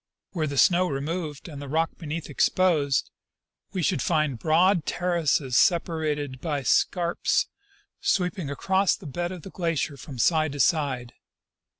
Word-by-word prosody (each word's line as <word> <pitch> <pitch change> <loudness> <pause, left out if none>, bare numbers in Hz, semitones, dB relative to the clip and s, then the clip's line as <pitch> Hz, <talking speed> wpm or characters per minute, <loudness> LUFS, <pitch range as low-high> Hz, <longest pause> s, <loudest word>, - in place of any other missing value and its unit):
Were 160 -4 -1
the 140 -1 -4
snow 180 +2 +4
removed 150 +2 -4
and 145 -4 -8
the 140 - -7
rock 160 +3 +1
be 165 - -8
neath 160 +2 -4
exposed, 150 -2 +1 0.6
we 185 - -2
should 180 - +1
find 155 -7 0
broad 170 - +3
terraces 165 -7 0
separated 150 -4 +1
by 145 -5 -2
scarps 170 +6 +1 0.5
sweeping 180 -4 0
across 190 +6 +1
the 195 - -14
bed 175 +5 -3
of 180 -4 -8
the 195 - -9
glacier 165 -5 -2
from 140 -2 -9
side 155 +4 +2
to 145 - -7
side. 135 -6 +1
160 Hz, 150 wpm, -26 LUFS, 145-175 Hz, 0.6 s, snow